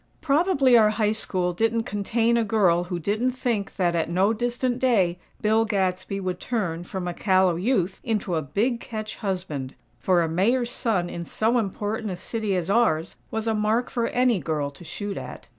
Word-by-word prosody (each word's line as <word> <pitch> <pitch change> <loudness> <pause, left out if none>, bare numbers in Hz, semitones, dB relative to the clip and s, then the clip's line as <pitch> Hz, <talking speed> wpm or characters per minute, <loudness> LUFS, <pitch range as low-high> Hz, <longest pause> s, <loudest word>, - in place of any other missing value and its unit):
Probably 285 -4 +3
our 220 -2 +6
High 215 -1 +1
School 185 -4 -1
didn't 225 +4 +1
contain 225 +3 0
a 235 - +3
girl 190 -5 +2
who 180 -1 -3
didn't 215 +9 0
think 235 -6 -2
that, 175 -3 +1
at 165 -1 0
no 190 +5 +2
distant 245 +2 -1
day, 195 -9 +2 0.2
Bill 220 +1 +3
Gadsby 190 -2 -1
would 185 -2 -3
turn, 185 -9 -2
from 185 0 -4
a 175 - -2
callow 185 -2 +3
youth, 190 -1 0
into 210 -6 -1
a 160 - +1
"big 215 - 0
catch" 215 -2 -6
husband; 180 -10 -4 0.2
for 180 -2 +3
a - - 0
Mayor's 235 +9 +1
son 200 -9 0
in 170 -1 -5
so 225 +7 +1
important 210 +1 -3
a 180 - -4
city 215 +1 -2
as 175 -2 -1
ours 195 -7 +2
was 220 0 -3
a 225 - +1
mark 215 +3 0
for 235 -1 0
any 245 -4 +2
girl 150 -4 -2
to 140 - -14
shoot 200 +4 -5
at. - - -8
205 Hz, 190 wpm, -25 LUFS, 180-230 Hz, 0.2 s, our